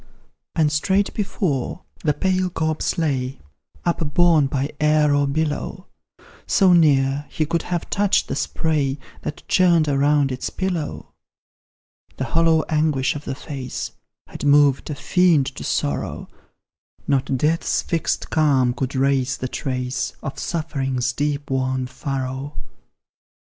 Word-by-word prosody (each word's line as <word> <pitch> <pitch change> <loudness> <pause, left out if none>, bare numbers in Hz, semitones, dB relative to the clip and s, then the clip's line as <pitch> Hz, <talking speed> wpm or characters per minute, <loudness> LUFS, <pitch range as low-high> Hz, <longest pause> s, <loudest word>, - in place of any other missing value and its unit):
And 155 -2 +3
straight 190 +7 +1
before, 185 - -2 0.2
the 150 -3 +2
pale 185 -1 +1
corpse 160 -2 -1
lay, 135 -5 -1 0.5
Upborne 165 -2 +3
by 135 +1 -2
air 150 -1 +3
or 145 0 +2
billow, 155 +5 -2 0.6
So 190 -5 +5
near, 145 -3 +3
he 155 - -1
could 165 +2 0
have 175 -1 -3
touched 205 -1 +2
the - - -3
spray 145 -4 0 0.2
That 150 - -6
churned 170 -4 +4
around 145 0 +2
its 130 - -3
pillow. 180 -5 -3 1.1
The - - -2
hollow 160 +4 +3
anguish 150 -4 +1
of 145 - -7
the - - -3
face 135 -3 -6 0.3
Had - - -9
moved 145 -1 +4
a 150 - -3
fiend 170 -2 +3
to - - -8
sorrow; 70 -2 -2 0.8
Not 135 -1 +1
death's 155 +5 +1
fixed 165 -2 -2
calm 135 -6 +3
could 130 +2 -3
rase 130 -1 +1
the 130 - -3
trace 125 -1 -3
Of 135 - -5
suffering's 135 -6 -2
deep 145 0 -2
worn 130 -1 0
furrow. 135 +2 -4
145 Hz, 130 wpm, -22 LUFS, 135-165 Hz, 1.1 s, So